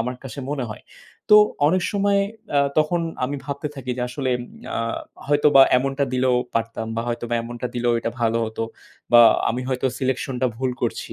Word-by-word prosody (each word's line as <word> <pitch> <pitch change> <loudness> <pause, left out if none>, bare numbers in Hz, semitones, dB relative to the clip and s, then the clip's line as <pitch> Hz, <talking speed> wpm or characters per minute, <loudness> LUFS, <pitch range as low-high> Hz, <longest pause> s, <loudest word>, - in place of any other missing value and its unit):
আমার 125 +2 -2
কাছে 130 0 -8
মনে 140 -3 -2
হয়। 110 - -9 0.5
তো 210 - +10 0.3
অনেক 185 +4 +2
সময় 200 0 +2 0.3
অ্যা 145 - +4 0.2
তখন 160 +3 +2 0.2
আমি 140 +2 -3
ভাবতে 140 +1 -4
থাকি 130 -2 -6
যে 125 - -2
আসলে 130 0 -2
উম - - -6 0.2
ইয়া - - -5 0.5
হয়তোবা 145 -1 +6 0.2
এমনটা 135 +2 -1
দিলেও 125 -1 +2 0.2
পারতাম 115 0 -2
বা - - 0
হয়তো 120 0 -3 0.2
এমনটা 120 +1 -5
দিলেও 120 0 +1
এটা 115 - -2
ভালো 115 0 +2
হত। 110 0 -8 0.5
বা 120 - +9 0.3
আমি 120 +2 -2
হয়তো 130 0 0
selection 130 0 -2
টা 130 - +4
ভুল 130 +1 -1
করছি। - - -3
130 Hz, 185 wpm, -22 LUFS, 120-145 Hz, 0.5 s, তো